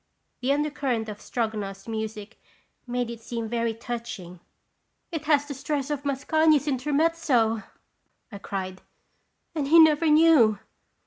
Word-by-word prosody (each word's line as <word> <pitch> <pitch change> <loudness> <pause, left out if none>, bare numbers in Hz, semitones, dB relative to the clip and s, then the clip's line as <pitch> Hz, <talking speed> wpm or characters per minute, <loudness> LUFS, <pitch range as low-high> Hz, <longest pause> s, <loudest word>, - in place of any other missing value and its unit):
The 255 +2 +1
undercurrent 280 -6 -1
of 210 0 -8
Stroganoff's 210 -5 -4
music 220 -2 -6 0.5
made 245 -1 -2
it 230 -1 -9
seem 230 0 -4
very 230 0 -1
touching. 225 -7 -7 0.4
" - - -50
It 320 -2 -4
has 290 -1 +3
the 290 - -6
stress 280 +1 -3
of 285 -1 -3
Mascagni's 300 +2 +2
Intermez 300 +5 0
zo!" 225 -6 +2 0.7
I 200 - -8
cried. 185 -1 -5 0.7
"And 295 -4 -2
he 325 +4 +6
never 315 0 +6
knew!" 300 -9 +5
245 Hz, 135 wpm, -26 LUFS, 220-295 Hz, 0.7 s, he